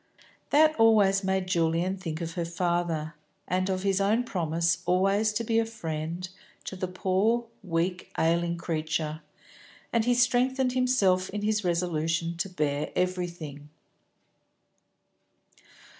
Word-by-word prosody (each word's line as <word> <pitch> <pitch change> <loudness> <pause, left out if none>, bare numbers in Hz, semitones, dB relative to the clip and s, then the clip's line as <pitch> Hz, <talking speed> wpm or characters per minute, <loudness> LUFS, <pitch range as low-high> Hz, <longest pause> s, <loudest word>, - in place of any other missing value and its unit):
That 310 +2 +5
always 205 -3 +5
made 190 0 0
Julian 170 +1 +1
think 170 -4 -5
of 165 0 -4
her 175 - -2
father, 170 -2 -1 0.3
and 185 +1 0
of 185 0 -1
his 195 0 +1
own 215 +5 +2
promise 170 -4 0
always 195 +4 +2
to 230 +2 -1
be 225 0 +2
a - - +3
friend 165 -4 -4 0.4
to - - -6
the 185 0 -3
poor, 195 +6 +1 0.2
weak, 180 0 -2
ailing 170 +1 +1
creature; 155 -1 -2 0.7
and 230 -2 +3
he 245 +1 +2
strengthened 250 +1 +2
himself 205 -8 +2
in 205 +1 -4
his 215 0 +1
resolution 170 -1 0
to 190 +3 -2
bear 150 -4 -1
everything. 170 -5 -3
185 Hz, 130 wpm, -27 LUFS, 165-210 Hz, 0.7 s, That